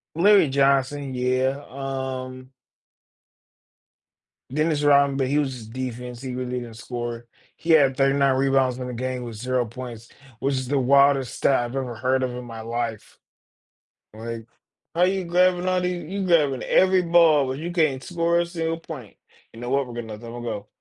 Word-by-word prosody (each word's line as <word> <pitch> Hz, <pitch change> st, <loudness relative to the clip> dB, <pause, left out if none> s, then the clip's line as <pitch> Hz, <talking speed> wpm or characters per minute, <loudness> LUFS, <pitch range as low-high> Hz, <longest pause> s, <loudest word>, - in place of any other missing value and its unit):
Larry 190 Hz, -2 st, +5 dB
Johnson, 135 Hz, 0 st, +1 dB
yeah, 130 Hz, +3 st, 0 dB
um 130 Hz, -1 st, -5 dB, 2.0 s
Dennis 155 Hz, +2 st, 0 dB
Rodman, 140 Hz, -1 st, +4 dB
but 135 Hz, -2 st, 0 dB
he 145 Hz, +2 st, +1 dB
was 140 Hz, -3 st, 0 dB
his 115 Hz, -3 st, -10 dB
defense, 125 Hz, 0 st, -6 dB
he 130 Hz, -1 st, -5 dB
really 125 Hz, 0 st, -3 dB
didn't 115 Hz, -2 st, -9 dB
score. 120 Hz, -1 st, -5 dB, 0.3 s
He 170 Hz, -, -5 dB
had 140 Hz, -5 st, +5 dB
39 135 Hz, -1 st, +3 dB
rebounds 135 Hz, -2 st, +2 dB
in 125 Hz, -, -5 dB
the 125 Hz, -, -5 dB
game 130 Hz, +1 st, -3 dB
with 115 Hz, -2 st, -7 dB
0 125 Hz, +2 st, 0 dB
points, 120 Hz, -1 st, -9 dB, 0.3 s
which 140 Hz, +1 st, 0 dB
is 130 Hz, -1 st, -3 dB
the 140 Hz, +1 st, +1 dB
wildest 135 Hz, 0 st, +4 dB
stat 135 Hz, -3 st, +2 dB
I've 120 Hz, +3 st, -6 dB
ever 125 Hz, -3 st, -3 dB
heard 130 Hz, +2 st, 0 dB
of 130 Hz, -, 0 dB
in 125 Hz, 0 st, -7 dB
my 115 Hz, -1 st, -8 dB
life. 115 Hz, -1 st, -4 dB, 1.0 s
Like, 115 Hz, 0 st, -7 dB, 0.5 s
how 170 Hz, -, +1 dB
are 180 Hz, -, +7 dB
you 190 Hz, -1 st, 0 dB
grabbing 180 Hz, +1 st, +2 dB
all 185 Hz, 0 st, +2 dB
the 180 Hz, -, 0 dB
you're 180 Hz, +2 st, -4 dB
grabbing 150 Hz, -7 st, +3 dB
every 185 Hz, 0 st, +4 dB
ball, 165 Hz, -4 st, +5 dB
but 130 Hz, +1 st, -3 dB
you 170 Hz, +3 st, -4 dB
can't 155 Hz, -6 st, +1 dB
score 170 Hz, 0 st, +1 dB
a 175 Hz, -, 0 dB
single 165 Hz, -1 st, -3 dB
point. 130 Hz, -11 st, -9 dB, 0.4 s
You 115 Hz, -, -12 dB
know 120 Hz, +1 st, -5 dB
what? 140 Hz, 0 st, +1 dB
We're 120 Hz, -, -9 dB
gonna 120 Hz, -1 st, -6 dB
let 105 Hz, -, -11 dB
that 115 Hz, -1 st, -9 dB
one 120 Hz, 0 st, -7 dB
go. 105 Hz, -3 st, -5 dB
130 Hz, 185 wpm, -24 LUFS, 125-150 Hz, 2.0 s, are